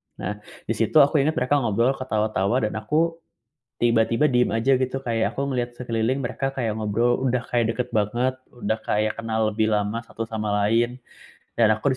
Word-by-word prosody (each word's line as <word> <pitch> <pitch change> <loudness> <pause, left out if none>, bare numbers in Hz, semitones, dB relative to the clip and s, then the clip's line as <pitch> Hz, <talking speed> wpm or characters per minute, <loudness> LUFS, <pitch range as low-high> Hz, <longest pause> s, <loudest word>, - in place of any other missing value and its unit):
Nah, 105 0 -5 0.2
di - - -4
situ 115 +5 -1
aku 145 +1 +2
ingat 155 +3 +1
mereka 125 +4 +2
ngobrol, 120 +1 +2
ketawa-tawa 110 -1 0
dan 105 - -1
aku, 165 +8 0 0.6
tiba-tiba 115 +4 +3
diam 125 -2 +2
aja 125 +4 +3
gitu, 130 +1 -2
kayak 115 -3 -1
aku 140 +1 -2
ngeliat 125 -2 -2
sekeliling 120 +1 -1
mereka 135 +2 -2
kayak 115 -5 -2
ngobrol 110 +3 +1
udah 125 -1 +1
kayak 115 -2 +1
dekat 125 +1 -3
banget, 120 +5 0 0.2
udah 110 -3 -2
kayak 105 +1 0
kenal 110 -1 -2
lebih 110 0 0
lama 105 +3 -1
satu 115 0 -6
sama 110 -2 -2 0.2
lain. 120 +3 +1 0.6
Dan 110 -2 +5
aku 110 +5 0
115 Hz, 175 wpm, -24 LUFS, 110-130 Hz, 0.6 s, Dan